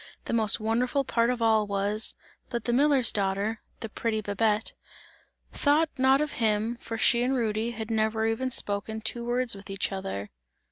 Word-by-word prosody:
The - - -3
most 220 -2 +4
wonderful 245 +5 0
part 235 -2 +1
of 245 -2 -1
all 220 -2 +3
was, 205 +2 -1 0.3
that 235 -2 -3
the 240 - -1
miller's 270 -2 +4
daughter, 200 +2 -1 0.2
the 225 - -3
pretty 220 0 -2
Babette, 210 +1 0 0.8
thought 305 +2 +2
not 265 +2 +4
of 300 -1 -1
him, 220 0 0
for 225 -1 -6
she 235 +1 +3
and 255 +2 +1
Rudy 225 -1 -1
had 225 -1 -6
never 220 0 +1
even 225 +4 0
spoken 220 -1 -2
two 235 +2 -2
words 245 +1 +1
with 195 -1 -9
each 195 +1 -1
other. 190 - -5
225 Hz, 175 wpm, -27 LUFS, 210-240 Hz, 0.8 s, most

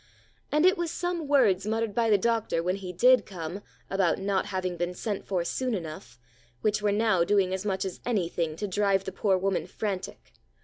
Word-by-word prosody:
And 300 +3 +3
it 375 0 +4
was 345 -1 -1
some 345 -2 -3
words 215 -9 +3
muttered 225 -1 -1
by 230 +1 +1
the 210 - +5
doctor 220 -5 0
when 180 +2 0
he 185 -2 -6
did 250 +8 +5
come, 175 0 -6 0.3
about 190 -3 +1
not 195 0 -1
having 185 -2 -2
been 175 +1 -3
sent 205 0 -4
for 185 -3 0
soon 255 +2 -1
enough, 155 - -7 0.4
which 210 0 +1
were 205 -1 +2
now 210 -4 +3
doing 190 0 +2
as 190 +2 -3
much 195 -1 -1
as 190 - -5
any 210 -8 0
thing 165 -2 -2
to 205 +5 -3
drive 195 0 +1
the 190 - -5
poor 190 0 +1
woman 185 -3 -1
frantic. 195 -1 -5
195 Hz, 205 wpm, -28 LUFS, 185-220 Hz, 0.4 s, the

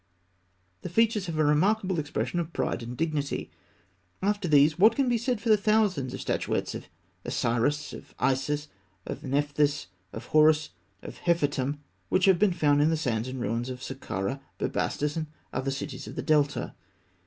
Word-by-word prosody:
The - - -5
features 215 +1 +2
have 165 -2 -3
a 155 - +3
remarkable 185 +4 +2
expression 155 +3 -2
of 170 -1 -4
pride - - -1
and 120 +1 -7
dignity. 155 -3 -2 0.7
After 205 -1 0
these, 150 +1 +4
what 215 +4 +6
can 275 -2 +1
be 240 -1 +2
said 245 -1 -1
for 230 - -3
the 215 - +7
thousands 200 - +1
of - - -6
statuettes - - -1
of - - -7 0.4
Osiris, 125 +4 0
of - - -11
Isis, 145 +3 0 0.4
of 145 - -6
Nephthys, 145 - +1 0.3
of 115 +2 -8
Horus, 155 0 +5 0.3
of - - -9
Nefertûm, 145 -4 +1 0.3
which 185 - +3
have 190 -3 +5
been 210 -2 +4
found 145 -4 +3
in 150 - +4
the 160 - +1
sands 120 -6 -1
and 130 0 -5
ruins 120 +2 -2
of 130 0 -7
Sakkarah, 135 -1 -4 0.2
Bubastis, 150 0 -1
and 160 -1 -2 0.3
other 135 - -1
cities 135 0 -5
of - - -8
the - - -3
Delta? 145 -2 +1
150 Hz, 170 wpm, -28 LUFS, 135-180 Hz, 0.7 s, the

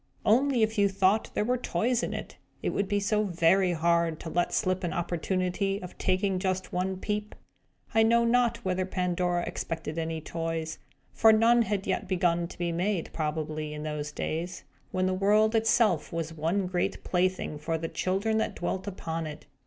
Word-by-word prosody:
Only, 250 +2 +4
if 220 -1 0
you 200 0 +4
thought 195 +2 +2
there 210 - +1
were 250 +1 +1
toys 240 +4 0
in - - -2
it, - - -6 0.3
it - - 0
would 200 - -1
be 205 +1 +1
so 210 +1 +1
very 180 +1 +3
hard 170 -1 +1
to 165 - -6
let 175 0 +1
slip 185 -2 0
an 175 - -1
opportunity 185 +3 -1
of 180 -2 -9
taking 185 0 +1
just 185 0 -2
one 185 +1 -1
peep! 210 +2 -3 0.6
I 225 - +5
know 235 +1 +4
not 235 -1 +2
whether 185 0 0
Pandora 180 -1 0
expected 165 -1 -4
any 160 0 -2
toys; 165 0 -4 0.3
for 225 - +6
none 230 +2 +5
had 205 -3 -1
yet 190 - -1
begun 175 -2 +1
to - - -12
be 175 -1 -1
made, 180 +1 -1
probably, 155 -1 -3
in 150 - -6
those 150 -1 -4
days, 170 +4 -4 0.3
when 185 0 0
the 185 - +1
world 210 +3 +3
itself 220 -6 +2
was 165 -1 -3
one 165 +5 0
great 180 -1 -2
plaything 185 -4 0
for 160 +2 -1
the 165 +1 -3
children 200 +6 0
that - - -1
dwelt 190 +2 -3
upon 165 -4 -4
it. 150 -1 -9
185 Hz, 185 wpm, -28 LUFS, 165-205 Hz, 0.6 s, for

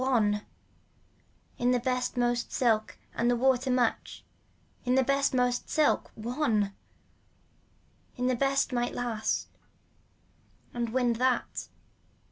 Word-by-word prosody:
One. 215 -6 +2 1.2
In 245 - +2
the 250 0 +3
best 250 +1 -1
most 240 0 0
silk 225 -5 +1 0.2
and 240 +1 +1
water 260 0 +2
much, 250 -2 0 0.6
in 250 0 +1
the 265 - +4
best 275 +1 +2
most 250 -1 0
silk. 310 -2 +2
One. 220 -4 0 1.4
In 250 - -1
the 255 0 +2
best 275 +1 +1
might 240 0 -1
last 235 -3 -2 1.2
and 235 -1 -2
wind 240 -1 +1
that. 255 +1 0
245 Hz, 110 wpm, -29 LUFS, 235-260 Hz, 1.4 s, the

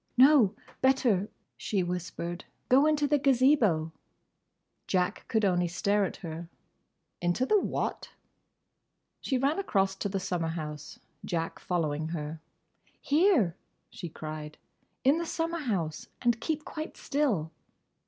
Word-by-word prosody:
"No! 255 -6 +6 0.3
Better!" 245 -7 +3 0.3
she 195 -3 -1
whispered. 175 0 -4 0.2
"Go 275 +4 +6
into 300 -1 +2
the 290 0 +3
Gazebo." 250 - +3 1.0
Jack 185 +1 0
could 220 -2 +2
only 180 -2 +2
stare 200 +4 +1
at - - -5
her. 165 +1 -6 0.7
"Into 175 +9 +1
the 420 +8 +4
what?" - - -2 1.1
She 265 - 0
ran 280 +8 +1
across 195 - +1
to 200 - -2
the 195 0 -1
summer 180 -3 -2
house, 155 -2 -6 0.3
Jack 165 -1 -3
following 155 -3 -1
her. 155 -1 -5 0.6
"Here," 290 - +3 0.4
she 175 - -7
cried, 155 -1 -7 0.5
"in 280 +5 +4
the 340 - -2
summer 330 +1 -2
house. 180 - -2
And 240 -2 +1
keep 310 -1 -2
quite 310 0 -6
still." 235 - 0
195 Hz, 125 wpm, -29 LUFS, 170-275 Hz, 1.1 s, No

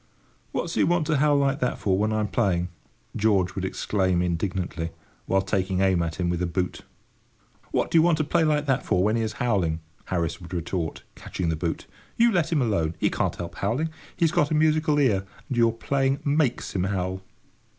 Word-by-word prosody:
"What's - - -2
he - - +2
want 170 -2 +2
to 155 -1 +1
howl 145 +1 +4
like 140 0 +1
that 125 - 0
for 95 -2 +1
when 105 +3 +1
I'm 110 -1 0
playing?" 90 -3 0 0.5
George 100 -4 +2
would 95 - -4
exclaim 95 -2 0
indignantly, 90 -1 -2 0.4
while 95 0 +2
taking 95 -1 0
aim 95 -3 +3
at 85 -1 -2
him 90 -1 -1
with 85 0 -1
a 90 - +1
boot. 90 +2 -2 0.9
"What - - 0
do 165 - +6
you - - +7
want 165 -1 +3
to 155 - +1
play 165 +3 +2
like 150 -1 +2
that 135 -2 +1
for 90 - +1
when 105 +2 +2
he 115 - +1
is 110 0 -2
howling?" 95 -11 0 0.3
Harris 85 -1 -2
would 85 +1 -7
retort, 85 -1 -3
catching 85 -3 -4
the 80 - 0
boot. 80 +1 -3 0.3
"You 235 0 +5
let 175 -5 +1
him 150 -5 +2
alone. 85 -8 0
He - - +1
can't - - -1
help 85 -1 -6
howling. 130 +11 -1 0.3
He's 165 -2 +3
got 145 - +2
a 155 - +1
musical 155 0 +3
ear, 115 -10 +3 0.3
and 130 - -2
your 115 -1 +5
playing 135 +4 0
makes 145 -7 0
him 90 -1 +1
howl." 95 -1 -2
100 Hz, 205 wpm, -25 LUFS, 90-140 Hz, 0.9 s, you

